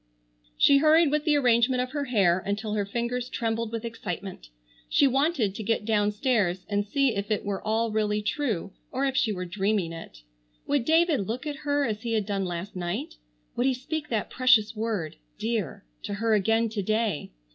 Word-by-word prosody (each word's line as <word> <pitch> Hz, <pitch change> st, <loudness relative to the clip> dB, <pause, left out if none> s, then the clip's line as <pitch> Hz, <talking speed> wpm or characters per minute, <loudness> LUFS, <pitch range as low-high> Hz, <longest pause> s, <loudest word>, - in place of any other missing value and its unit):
She 280 Hz, -, +6 dB
hurried 310 Hz, +1 st, +5 dB
with 300 Hz, 0 st, 0 dB
the 305 Hz, -2 st, +3 dB
arrangement 250 Hz, -2 st, +3 dB
of 250 Hz, 0 st, -2 dB
her 285 Hz, 0 st, -2 dB
hair 195 Hz, -8 st, +3 dB
until 210 Hz, +1 st, -2 dB
her 205 Hz, -2 st, -1 dB
fingers 240 Hz, +3 st, -2 dB
trembled 225 Hz, -1 st, -2 dB
with 230 Hz, 0 st, -4 dB
excitement. 195 Hz, -, -6 dB, 0.4 s
She -, -, +4 dB
wanted 270 Hz, -, +2 dB
to 220 Hz, -, -6 dB
get 215 Hz, 0 st, -1 dB
downstairs 210 Hz, -3 st, +1 dB
and 205 Hz, 0 st, 0 dB
see 270 Hz, +4 st, +1 dB
if 200 Hz, +1 st, -3 dB
it 215 Hz, -1 st, -1 dB
were 200 Hz, -1 st, -2 dB
all 220 Hz, +1 st, 0 dB
really 210 Hz, -1 st, 0 dB
true 215 Hz, -, -2 dB, 0.2 s
or 270 Hz, +2 st, 0 dB
if 270 Hz, -1 st, -1 dB
she 225 Hz, -, +2 dB
were 180 Hz, -3 st, -4 dB
dreaming 195 Hz, -1 st, -1 dB
it. 110 Hz, -, -10 dB, 0.4 s
Would 285 Hz, -4 st, 0 dB
David 320 Hz, -, +3 dB
look 245 Hz, +6 st, -4 dB
at 295 Hz, -2 st, -4 dB
her 285 Hz, 0 st, +2 dB
as 215 Hz, -3 st, -3 dB
he 230 Hz, -1 st, -3 dB
had 215 Hz, -2 st, +1 dB
done 195 Hz, -1 st, -1 dB
last 175 Hz, +2 st, -5 dB
night? 175 Hz, -, -4 dB, 0.4 s
Would 245 Hz, -, +1 dB
he 265 Hz, -, +2 dB
speak 300 Hz, +4 st, -5 dB
that 225 Hz, -3 st, -2 dB
precious 245 Hz, -4 st, +4 dB
word 210 Hz, -8 st, -3 dB, 0.2 s
"dear" 215 Hz, -, -3 dB, 0.2 s
to 205 Hz, -, -4 dB
her 225 Hz, +2 st, +1 dB
again 225 Hz, +3 st, +2 dB
to 215 Hz, -1 st, -3 dB
day? 215 Hz, -4 st, -1 dB
225 Hz, 190 wpm, -27 LUFS, 200-255 Hz, 0.4 s, She